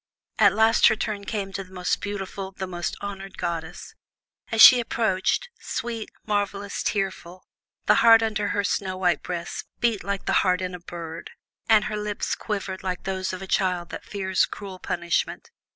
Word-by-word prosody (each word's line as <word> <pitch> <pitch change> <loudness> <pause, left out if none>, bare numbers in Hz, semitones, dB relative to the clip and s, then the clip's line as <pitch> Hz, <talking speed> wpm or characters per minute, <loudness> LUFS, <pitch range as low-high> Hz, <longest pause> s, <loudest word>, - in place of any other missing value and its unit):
At 200 -3 +6
last 220 +1 +5
her - - +4
turn 210 -2 -3
came 200 -2 -3
to 195 - -3
the 185 - -19
most 180 -1 -1
beautiful, 195 -1 -5
the 190 - -4
most 175 -2 -4
honored 195 -1 -7
goddess. 165 +1 -4 0.6
As 225 - -1
she 250 +2 +11
approached, 225 - 0
sweet, 230 -2 -4 0.2
marvellous, 205 -1 -2
tearful, 190 -3 -3 0.4
the - - +6
heart 230 -1 +7
under 215 -2 0
her 205 0 0
snow 190 -2 -1
white 180 -4 +1
breast 170 -1 -5
beat 230 -4 +1
like 200 -1 -3
the - - +1
heart 180 -2 +2
in 185 -1 -3
a 180 - -6
bird, 170 -1 -8 0.4
and 220 -2 +6
her 215 - -3
lips 210 -1 -2
quivered 195 -3 -4
like 180 -1 -3
those 190 -1 -2
of 185 0 -6
a - - -5
child 180 -3 0
that - - -7
fears 190 -2 0
cruel 195 -2 -8
punishment. 170 -1 -2
195 Hz, 175 wpm, -25 LUFS, 185-210 Hz, 0.6 s, she